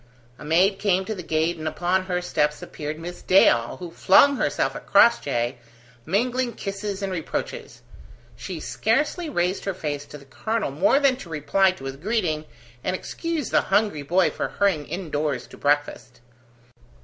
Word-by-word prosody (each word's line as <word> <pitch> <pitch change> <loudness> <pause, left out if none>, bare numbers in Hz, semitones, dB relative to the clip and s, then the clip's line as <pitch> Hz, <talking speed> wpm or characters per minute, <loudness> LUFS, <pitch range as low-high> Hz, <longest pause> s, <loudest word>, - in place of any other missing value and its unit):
A - - -10
maid 180 +6 +3
came 190 -2 +1
to 220 - -3
the 190 - -6
gate, 160 +1 0
and 155 0 -5
upon 180 +4 0
her 180 -1 -2
steps 150 -3 0
appeared 150 0 -6
Miss 175 +2 -8
Dale, 120 -11 +4
who 175 -2 -8
flung 275 +11 +5
herself - - 0
at - - -9
Crossjay, 130 - +3 0.5
mingling 240 +6 0
kisses 200 0 -5
and 195 - -2
reproaches. 165 -4 -5 0.5
She 180 +6 -6
scarcely 230 - 0
raised 180 -6 -1
her 195 -2 -2
face 145 -4 -4
to 150 - -10
the 140 - -16
colonel 220 +5 -2
more 185 - +3
than 275 -3 +3
to 195 - -10
reply 165 +5 +2
to 135 - -13
his 135 0 -5
greeting, 170 -4 -1 0.4
and 185 - -1
excuse 325 - -4
the - - +4
hungry 200 -6 +1
boy 175 +6 +2
for - - -3
hurrying 185 -8 0
indoors 150 -6 -3
to - - -14
breakfast. 145 -5 -1
180 Hz, 165 wpm, -24 LUFS, 150-200 Hz, 0.5 s, flung